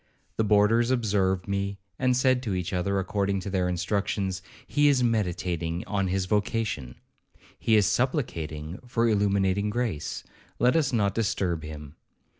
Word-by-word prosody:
The 110 - +2
boarders 105 +3 +4
observed 100 -7 +1
me, 100 0 -2 0.2
and 125 -1 +2
said 130 -1 +3
to 105 -7 -2
each 90 +1 -3
other, 100 +2 0
according 100 +1 0
to 100 - -5
their 90 -2 +1
instructions, 95 +1 -1 0.2
'He 145 0 +3
is 135 -3 +4
meditating 90 -6 -1
on 100 -2 -1
his 95 +1 0
vocation, 105 - -1 0.6
he 110 - +3
is 105 -2 +5
supplicating 85 - -1
for 120 -1 +1
illuminating 100 -1 +2
grace, 110 -9 -2 0.3
let 125 +4 +3
us 155 -5 +2
not 100 -5 +1
disturb 95 -6 0
him.' 75 -2 -9
100 Hz, 145 wpm, -27 LUFS, 90-115 Hz, 0.6 s, is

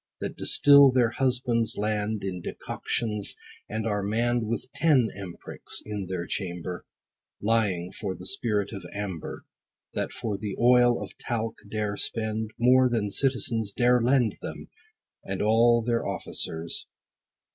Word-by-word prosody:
That - - -4
distill, 140 -1 +6
their 125 -3 +3
husbands' 125 -3 0
land 105 0 -1
20 - - -3
In - - -8
decoctions; 105 +3 -2 0.3
and 110 +1 -3
are 105 -2 0
mann'd 115 +3 0
With 115 +3 -3
ten 140 -8 +3
emp'rics, 95 -3 -6
in 105 -3 -4
their 90 -2 -3
chamber, 90 -1 -5 0.5
Lying 100 -5 +1
for 95 -2 -4
the 90 +1 -10
spirit 105 -3 0
of 100 -3 -6
amber. 100 -6 -5 0.5
That - - -2
for 105 -4 -4
the 100 -2 -4
oil 120 0 +5
of - - -8
talc 115 -2 -3
dare 105 -1 -2
spend 110 -1 -2
More 125 +2 +5
than 110 -4 -1
citizens 115 -5 +1
dare 125 0 +3
lend 120 -3 +2
Them, - - -7 0.5
and - - -4
all 115 +2 +4
their 115 0 0
officers. 80 +1 -3
110 Hz, 140 wpm, -27 LUFS, 100-120 Hz, 0.5 s, distill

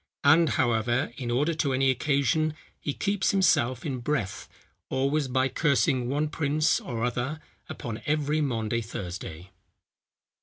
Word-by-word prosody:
And, 160 +2 +6
however, 120 0 +1
in 125 -4 -4
order 145 +8 +1
to 145 -4 0
any 135 0 +3
occasion 145 +3 +1 0.2
he 145 - -2
keeps 200 +6 0
himself 130 -11 +2
in 135 -4 -2
breath, 120 -7 -2 0.4
always 140 +2 +1
by 130 +1 +1
cursing 130 -3 +1
one 145 +3 0
prince 150 +1 +1
or 115 -3 -4
other 125 +5 -2 0.3
upon 115 -1 -6
every 150 0 +1
Maundy 115 -4 -1
Thursday." 90 -4 -7
135 Hz, 130 wpm, -27 LUFS, 120-150 Hz, 0.4 s, And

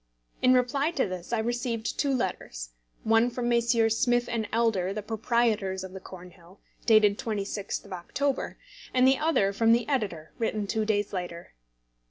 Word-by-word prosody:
In 255 0 +5
reply 275 +4 +2
to 280 -9 0
this 185 +1 -7
I 235 - +1
received 235 0 -2
two 280 - +2
letters, - - -3 0.3
one 225 +2 +4
from 240 0 -3
Messrs. 235 -2 +2
Smith 240 -1 +2 0.2
& - - -12
Elder, 215 -5 +1
the 210 0 -4
proprietors 220 -3 0
of 190 - -7
the 190 - -7
Cornhill, 180 0 -13 0.3
dated 215 -3 +5
26th 205 -2 -3
of 200 - -8
October, 270 +10 -2 0.4
and 255 0 +5
the 265 0 +4
other 255 -12 +2
from 225 +3 +4
the 235 0 +1
editor, 200 - -2
written 215 -2 -1
two 215 +2 -1
days 205 -1 0
later. 175 -2 -5
220 Hz, 165 wpm, -28 LUFS, 195-240 Hz, 0.4 s, In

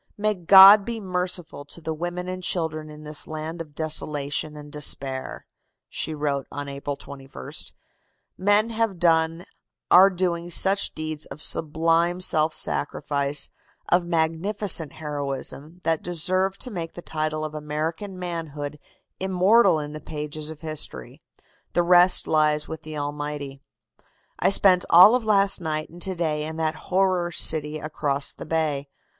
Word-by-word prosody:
"May 215 +1 +1
God 195 +3 +8
be 230 +1 -5
merciful 180 -5 -4
to 155 - -10
the 160 -1 -4
women 175 +3 -5
and 185 0 -5
children 160 -4 -3
in 150 0 -12
this 150 0 -3
land 160 +2 -6
of 150 -3 -11
desolation 150 -1 0
and 145 0 -11
despair!" 135 -2 -1 0.4
she 160 - -4
wrote 145 -2 -2
on 145 0 -5
April 140 0 -5
21st. 135 - -8 0.6
"Men 205 +4 +2
have 225 -4 -1
done, 165 0 +1 0.5
are 190 +2 +8
doing 175 -2 -2
such 195 +3 +2
deeds 155 -1 -4
of - - -10
sublime 165 +3 +3
self 155 -3 +2
sacrifice, 145 0 -1 0.4
of 175 0 +2
magnificent 165 +1 0
heroism, 150 +2 -5
that 165 -1 0
deserve 185 +3 -1
to 250 - -8
make 170 -5 -6
the 175 - -9
title 155 0 -2
of 155 - -7
American 155 +6 -4
manhood 155 -5 -5 0.4
immortal 190 +1 +3
in 150 -1 -5
the 155 - -8
pages 150 0 -6
of 160 -2 -10
history. 155 - -4 0.5
The 175 - +2
rest 180 +1 +5
lies 150 -1 +1
with 160 - -7
the 155 -1 -8
Almighty. 145 -1 -5 0.8
"I - - +3
spent 190 -2 +5
all 180 +6 +8
of 250 -1 +1
last 200 -3 +2
night 155 -2 -3
and 175 +1 -13
to 190 0 -1
day 155 -3 -1
in 160 +1 -6
that 160 -1 -1 0.2
horror 185 -2 +1
city 155 -2 -1
across 145 -2 -3
the - - -10
bay. 150 -3 -1
160 Hz, 150 wpm, -24 LUFS, 150-180 Hz, 0.8 s, God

